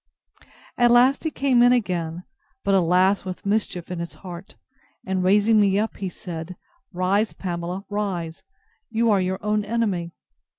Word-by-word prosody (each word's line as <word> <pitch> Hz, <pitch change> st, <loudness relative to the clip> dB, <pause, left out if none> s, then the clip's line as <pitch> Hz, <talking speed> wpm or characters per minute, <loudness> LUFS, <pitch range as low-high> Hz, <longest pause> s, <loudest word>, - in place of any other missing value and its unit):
At 240 Hz, 0 st, +5 dB
last 250 Hz, +5 st, +4 dB
he -, -, +2 dB
came 270 Hz, -5 st, +2 dB
in 245 Hz, 0 st, +6 dB
again, 175 Hz, -8 st, -1 dB, 0.4 s
but, 200 Hz, -, +1 dB
alas! 185 Hz, +2 st, +3 dB
with 185 Hz, 0 st, -7 dB
mischief 200 Hz, -4 st, -1 dB
in 180 Hz, -, -4 dB
his 170 Hz, 0 st, -6 dB
heart! 180 Hz, +2 st, -10 dB, 0.5 s
and 190 Hz, -1 st, -1 dB
raising 210 Hz, +3 st, +4 dB
me 195 Hz, -1 st, +3 dB
up, 220 Hz, +2 st, -1 dB
he 195 Hz, -2 st, -3 dB
said, 175 Hz, 0 st, -7 dB, 0.4 s
Rise, 195 Hz, +4 st, 0 dB
Pamela, 180 Hz, +1 st, -5 dB
rise; 190 Hz, -6 st, -3 dB, 0.5 s
you 230 Hz, 0 st, +2 dB
are 200 Hz, -2 st, +3 dB
your 185 Hz, +1 st, -1 dB
own 210 Hz, 0 st, +1 dB
enemy. 205 Hz, -7 st, -2 dB
195 Hz, 155 wpm, -23 LUFS, 180-215 Hz, 0.5 s, in